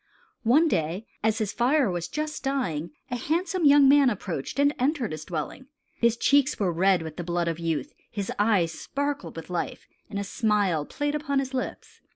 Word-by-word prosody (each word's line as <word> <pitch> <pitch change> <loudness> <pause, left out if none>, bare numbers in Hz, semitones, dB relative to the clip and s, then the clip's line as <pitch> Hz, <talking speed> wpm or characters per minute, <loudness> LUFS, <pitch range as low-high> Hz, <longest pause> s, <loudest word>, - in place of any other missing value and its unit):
One 280 +9 +4
day 175 - -1 0.2
as 220 0 +2
his 210 -2 -2
fire 255 -2 +2
was 175 -1 -3
just 305 0 -4
dying, 185 - -1 0.2
a - - 0
handsome 340 +7 0
young 285 -1 +7
man 280 -1 +6
approached 185 - -4
and 285 +1 +4
entered 260 -3 0
his 155 0 -6
dwelling. 175 - -5 0.3
His 235 0 +3
cheeks 280 +1 +3
were 185 -4 +1
red 185 0 +3
with 160 -1 -8
the 175 - -3
blood 175 0 -1
of 165 0 -2
youth; 165 - -2 0.2
his 200 -3 -4
eyes 205 -6 +3
sparkled 280 - -4
with 165 +2 -8
life; 175 - -3 0.2
and 205 - -5
a 200 - -1
smile 200 -8 +1
played 290 0 -2
upon 295 -2 -1
his 270 -1 -1
lips. 255 - -5
220 Hz, 190 wpm, -26 LUFS, 175-280 Hz, 0.3 s, young